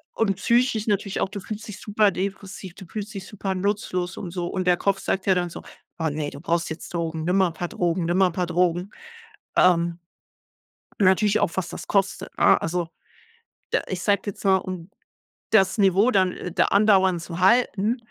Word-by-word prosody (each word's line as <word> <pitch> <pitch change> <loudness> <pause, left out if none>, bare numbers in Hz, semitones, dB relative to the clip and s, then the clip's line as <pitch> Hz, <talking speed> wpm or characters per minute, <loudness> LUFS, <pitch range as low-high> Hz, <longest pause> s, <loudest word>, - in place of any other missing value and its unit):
und 200 -3 +1
psychisch 235 0 +1
natürlich 200 -2 -1
auch, - - 0
du 205 0 -6
fühlst 215 +2 -7
dich 210 - -8
super 210 -1 +2
depressiv, 190 -1 -5
du 190 - -11
fühlst 210 +4 -6
dich 195 -2 -7
super 195 -2 -4
nutzlos 185 -2 -2
und 180 - -6
so 175 -1 -3
und 185 0 -3
der 180 - +5
Kopf 195 +1 0
sagt 190 - -2
ja 190 - +4
dann 175 -1 0
so: - - -9 0.3
„Oh 160 - -1
ne, 145 0 -3
du 140 - -10
brauchst 170 0 0
jetzt 160 +2 -8
Drogen. 165 -2 -2
Nimm 180 +2 +1
mal 190 -1 +4
'n 165 - -10
paar 175 +2 -4
Drogen, 175 0 -1
nimm 175 +2 0
mal 190 - +5
'n - - -10
paar 180 0 -1
Drogen." 175 +2 0 0.7
Ähm 170 -1 +3 1.0
natürlich 200 +2 +4
auch, 170 - +1
was 190 - -2
das - - -8
kostet, 195 -1 -1
ne? - - +5
Also, 170 0 -2 0.8
de - - +3
ich 185 -1 -4
sage 200 -2 +2
jetzt 205 - -6
mal, 190 -1 +5
um 185 -2 -6 0.6
das 190 -2 +4
Niveau 200 +3 +4
dann, 185 -5 +3
äh, 180 - -6
da - - +2
andauernd 190 -4 +3
zu 170 +1 -7
halten 220 +2 +3
190 Hz, 200 wpm, -24 LUFS, 175-200 Hz, 1.0 s, der